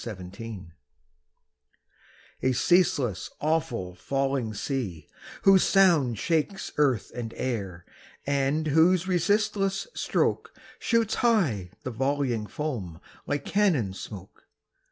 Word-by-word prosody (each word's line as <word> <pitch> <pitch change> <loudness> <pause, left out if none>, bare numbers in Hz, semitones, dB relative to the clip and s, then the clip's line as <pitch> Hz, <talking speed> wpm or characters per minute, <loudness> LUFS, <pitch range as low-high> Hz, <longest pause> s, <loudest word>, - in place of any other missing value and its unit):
NIAGARA 100 -2 -8 1.7
A 130 - +2
ceaseless, 135 - +2
awful, 150 - -1
falling 135 +3 -1
sea, 100 - -3 0.4
whose 195 -1 +7
sound 165 - +4
Shakes 165 - -1
earth 135 -6 +2
and 115 -2 -6
air, 100 -9 -3 0.4
and 140 +2 +1
whose 165 +4 +4
resistless 195 +2 +1
stroke - - -1 0.2
Shoots 230 -2 +1
high 155 - +2
the 130 - -4
volleying 130 -3 -1
foam 105 - -4 0.3
like 145 -1 -2
cannon 165 - +1
smoke! 95 -1 -10
135 Hz, 95 wpm, -27 LUFS, 110-170 Hz, 1.7 s, whose